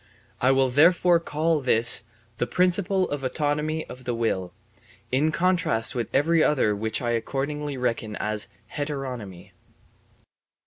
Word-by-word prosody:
I 125 - +3
will 135 -1 +3
therefore 170 +5 +4
call 160 -1 -1
this 120 -2 +5 0.3
the 120 - -1
principle 185 +1 +1
of 145 -2 -3
autonomy 150 +3 -1
of 125 0 -11
the 120 -2 -2
will, 95 -6 -2 0.6
in 145 +5 +2
contrast 170 -11 +1
with 120 -3 -3
every 160 +3 +3
other 115 -8 +2
which 110 +4 -3
I 120 - 0
accordingly 140 +4 -3
reckon 115 -4 -2
as 105 -1 -1 0.3
heteronomy. 130 - -6
135 Hz, 130 wpm, -25 LUFS, 115-155 Hz, 0.6 s, this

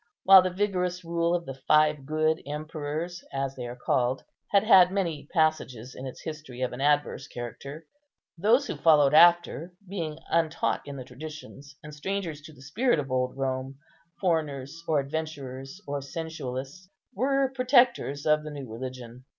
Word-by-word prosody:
While 190 -1 +9
the 185 - 0
vigorous 180 -2 -1
rule 170 +1 +1
of 170 -1 -3
the 135 - -6
five 150 +1 +2
good 155 +1 +1
emperors, 155 +3 -5
as 135 0 -3
they 125 -2 -5
are 120 - -7
called, 125 +1 0 0.3
had 200 0 +4
had 185 -5 +7
many 170 -7 -2
passages 130 -7 0
in 130 - -7
its 130 - -9
history 155 -6 -7
of 125 - -1
an 125 - -6
adverse 145 +1 +1
character, 140 +6 -8 0.5
those 225 +10 +3
who - - -5
followed 150 -3 +5
after, 175 +1 +5
being 165 -5 -4
untaught 165 -1 +1
in 140 - -7
the 130 - -6
traditions, 140 +1 -10
and 150 0 -9
strangers 165 -1 -4
to 155 - -12
the 135 -3 -16
spirit 225 - +1
of 135 -3 -4
old 125 0 -1
Rome, 135 0 -3 0.4
foreigners, 160 -3 -2
or 155 -2 +3
adventurers, 140 0 -5
or 145 0 -3
sensualists, 145 +2 -6 0.2
were 270 +4 +1
protectors 245 - +3
of 155 0 +4
the 155 - -6
new 140 -3 -7
religion. 125 +1 -8
155 Hz, 160 wpm, -27 LUFS, 135-175 Hz, 0.5 s, While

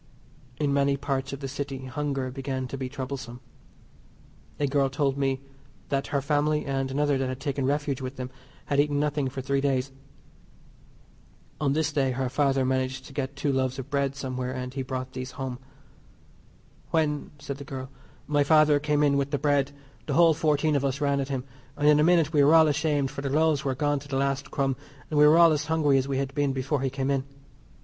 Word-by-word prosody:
In 145 -2 +1
many 140 0 +2
parts 135 -1 -2
of 140 +1 -6
the 135 - -3
City 135 -1 -5
hunger 135 -1 -2
began 135 -1 -3
to - - -4
be 130 -1 -4
troublesome. 130 -2 -6 1.2
A 145 - +2
girl 140 -1 +2
told 135 0 0
me 135 -1 0 0.5
that 140 -1 -1
her 140 -2 -1
family, 150 +1 +1
and 135 -1 -1
another 145 0 +1
that 135 - 0
had 130 0 -5
taken 140 -1 -1
refuge 145 -2 -1
with 130 +1 -5
them, 125 -1 -6 0.3
had 140 - 0
eaten 145 0 +2
nothing 145 -2 0
for 135 +1 -5
three 135 +1 0
days. 135 -1 0 1.7
On 140 -2 +1
this 155 0 0
day 135 -3 +1
her 130 0 -1
father 135 -1 +2
managed 130 0 -1
to 140 - -12
get 140 0 -3
two 140 0 0
loaves 130 0 0
of 135 0 -7
bread 140 -1 0
somewhere, 130 -2 -3
and 125 0 -5
he 135 - -3
brought 130 0 -5
these 130 0 -6
home. 130 -3 -5 1.3
"When," 150 -3 0
said 140 -1 -6
the - - -6
girl, 135 -1 -7 0.3
"my 145 -1 +2
father 155 0 +5
came 150 0 +1
in 140 -1 +3
with 140 0 0
the 145 - 0
bread 145 -1 +1 0.4
the - - -1
whole 170 -1 +6
fourteen 155 -1 +1
of 140 - +1
us 135 0 -1
ran 140 -1 +1
at 135 0 -2
him, 135 -2 -2 0.3
and 145 0 +2
in 150 0 +6
a - - +5
minute 165 -2 +3
we 145 -2 +5
were 150 +3 +6
all 160 -1 +7
ashamed 150 -2 +1
for 140 - -6
the 140 - -2
loaves 155 0 +2
were 135 -2 -1
gone 145 +1 +1
to 145 - -13
the 135 -2 -2
last 140 0 -1
crumb, 135 -2 0 0.4
and 150 - +2
we 150 - +8
were 155 +2 +6
all 170 -1 +7
as 155 0 0
hungry 150 -4 +3
as 130 - -2
we 135 -1 -1
had 135 0 -2
been 145 -1 +1
before 135 +2 -1
he 135 - 0
came 135 +1 -2
in. 135 -1 +1
140 Hz, 215 wpm, -27 LUFS, 135-145 Hz, 1.7 s, we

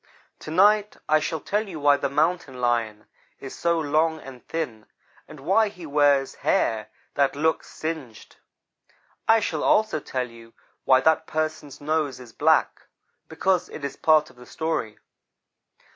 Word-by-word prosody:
To - - -9
night 205 +5 +3
I 155 0 +4
shall 160 +1 -3
tell 210 +7 -2
you 165 -4 -7
why 145 0 +5
the 140 -1 -2
Mountain 140 -3 0
lion 115 -3 -1 0.3
is 135 - -8
so 170 0 +1
long 160 +1 +1
and 130 -4 -12
thin 125 -10 -4 0.4
and 150 - -12
why 200 +8 +3
he 180 -4 -11
wears 145 -2 +2
hair 110 -1 0 0.2
that 140 -1 +1
looks 160 +2 0
singed. 155 -9 -7 0.9
I 225 0 +6
shall - - -2
also 215 -7 +2
tell 130 -3 -3
you 115 -1 -15 0.3
why 130 -1 +5
that 160 +3 +2
person's 155 -2 -3
nose 150 -3 -1
is 120 -3 -13
black, - - +1 0.4
because 180 +3 0
it 140 - -7
is 140 - -5
part 155 -1 +3
of - - -25
the 125 - -14
story. 160 -9 -3
150 Hz, 155 wpm, -24 LUFS, 130-160 Hz, 0.9 s, I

